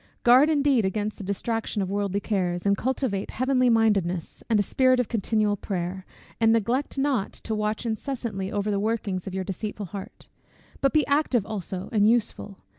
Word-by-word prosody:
Guard 255 +5 +6
indeed 285 -6 +3
against 205 +2 -2
the - - -6
distraction 220 +3 -2
of 190 -1 -1
worldly 200 0 -1
cares; 180 -4 -1
and 200 0 +4
cultivate 240 -4 -2
heavenly 255 0 +2
mindedness, 200 -7 +1
and 220 -2 +3
a - - +3
spirit 255 +4 +3
of 250 - +1
continual 215 -2 +1
prayer, 185 -1 -4 0.3
and 225 -1 +4
neglect 235 +6 0
not 270 -7 0
to 220 - -5
watch 215 +2 -1
incessantly 225 -4 -3
over 205 +1 -1
the 200 - 0
workings 205 -3 -2
of 190 - -5
your 190 - -1
deceitful 205 +2 -5
heart: 195 +2 -9 0.5
but 275 - +3
be 305 -2 +3
active 280 -7 +1
also, 190 -3 -4
and 210 -2 +4
useful. 215 -4 -1
215 Hz, 175 wpm, -25 LUFS, 195-240 Hz, 0.5 s, Guard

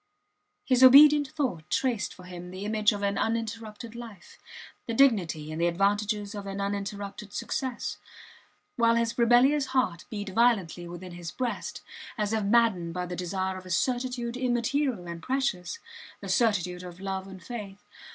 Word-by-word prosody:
His 255 -2 +3
obedient 290 +3 +9
thought 260 - -3
traced 240 -5 0
for 180 - -13
him 180 -1 -9
the 185 +2 -7
image 215 0 +2
of 205 -1 -4
an 200 0 0
uninterrupted 225 0 -3
life, 230 -6 -11 0.5
the 230 - -2
dignity 180 - +3
and 160 +2 -4
the 170 - +4
advantages 205 +3 0
of 200 -1 -6
an 195 0 -5
uninterrupted 200 0 -4
success; 260 +1 -3 0.8
while 230 -1 +4
his 235 +1 0
rebellious 260 +4 +4
heart 175 -9 0
beat 205 -2 -5
violently 190 -6 +1
within 175 +1 -8
his 175 -1 -7
breast, 250 +5 -4 0.3
as 210 0 -1
if 220 -1 0
maddened 200 -6 +2
by 180 0 -2
the 180 0 -5
desire 185 +1 -2
of 185 - -10
a - - -10
certitude 245 +4 -1
immaterial 245 -4 0
and 170 -1 -6
precious 255 -9 -1 0.4
the - - -8
certitude 180 -7 +1
of 180 0 -10
love 190 0 -4
and 190 -1 -11
faith. 205 -5 -8
205 Hz, 160 wpm, -28 LUFS, 185-240 Hz, 0.8 s, obedient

